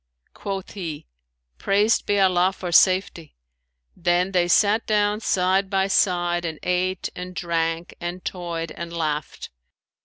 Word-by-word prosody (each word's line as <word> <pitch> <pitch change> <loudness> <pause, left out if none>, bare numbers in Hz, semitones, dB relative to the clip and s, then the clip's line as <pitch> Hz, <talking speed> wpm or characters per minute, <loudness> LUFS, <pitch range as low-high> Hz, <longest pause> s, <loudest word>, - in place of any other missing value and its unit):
Quoth 195 -2 -5
he, 165 -7 -6 0.5
'Praised 205 +3 +2
be 205 0 +2
Allah 185 -1 +3
for 180 -2 -6
safety!' 185 -3 +2 0.6
Then 175 +2 +1
they 180 -2 +2
sat 210 +5 +3
down 210 0 +1
side 190 -2 +1
by 190 -1 +1
side 175 -3 +1
and 160 -2 -4
ate 180 +1 -1
and 180 0 -7
drank 165 -2 -2
and 175 +1 -5
toyed 170 -3 -4
and 170 0 -7
laughed. 155 -3 -4
180 Hz, 130 wpm, -23 LUFS, 170-195 Hz, 0.6 s, Allah